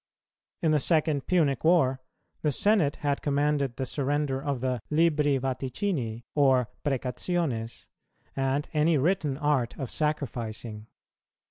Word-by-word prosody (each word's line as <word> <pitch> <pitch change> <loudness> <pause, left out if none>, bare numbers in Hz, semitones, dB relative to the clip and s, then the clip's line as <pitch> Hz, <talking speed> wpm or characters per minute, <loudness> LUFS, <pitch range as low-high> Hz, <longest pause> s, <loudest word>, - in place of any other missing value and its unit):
In 160 - +3
the 150 - +3
second 155 -2 +1
Punic 150 -8 +2
war, 135 -6 +3 0.4
the 150 - +1
senate 175 - +2
had 140 -1 +1
commanded 145 -3 0
the 130 - -3
surrender 140 0 -1
of 140 -2 -2
the 125 0 -1
libri 150 -3 +3
vaticini 130 - -2
or 130 -5 +3
precationes, 130 -2 -2 0.5
and 135 +2 0
any 155 +1 +3
written 150 -2 +1
art 145 -5 0
of 135 - -5
sacrificing. 115 -7 -3
140 Hz, 120 wpm, -27 LUFS, 130-150 Hz, 0.5 s, In